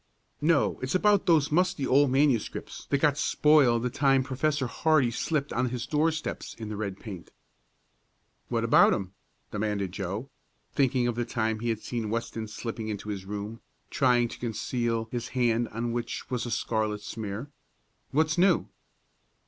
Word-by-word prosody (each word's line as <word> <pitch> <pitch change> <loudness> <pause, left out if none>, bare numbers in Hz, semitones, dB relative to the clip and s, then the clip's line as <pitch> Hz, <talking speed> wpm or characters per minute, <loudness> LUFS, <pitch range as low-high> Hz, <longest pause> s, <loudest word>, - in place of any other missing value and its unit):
"No, 155 0 +2
it's 130 +6 -2
about 205 +1 +3
those 155 -4 +4
musty 180 -3 +2
old 140 +2 +4
manuscripts 135 -4 0
that 140 - +2
got 145 0 +2
spoiled 140 -8 +4
the 125 - -1
time 135 0 +3
Professor 135 +2 0
Hardee 135 0 +2
slipped 150 +3 -1
on 125 +1 +1
his 125 -1 -4
doorsteps 160 +1 -1
in 110 -2 -7
the 105 - -4
red 100 -2 -4
paint." 95 -6 -9 1.2
"What - - 0
about - - +6
'em?" 95 -1 -5 0.4
demanded 105 -3 -2
Joe, 100 +7 -4 0.4
thinking 130 -3 +2
of 120 - 0
the 120 +1 -1
time 110 -2 -1
he 120 +1 -2
had 110 -1 -1
seen 115 -3 -3
Weston 115 0 -3
slipping 110 0 -5
into 105 0 -5
his 100 -2 -4
room, 105 +3 -6 0.3
trying 125 -3 +3
to - - -9
conceal 115 -1 -2
his 120 -1 -3
hand 120 -1 +2
on 115 +2 -3
which 120 +2 -4
was 125 -1 -1
a - - -5
scarlet 110 -2 -1
smear. 110 +6 -5 0.6
"What's 155 +3 +1
new?" 180 -2 +3
120 Hz, 160 wpm, -28 LUFS, 110-140 Hz, 1.2 s, about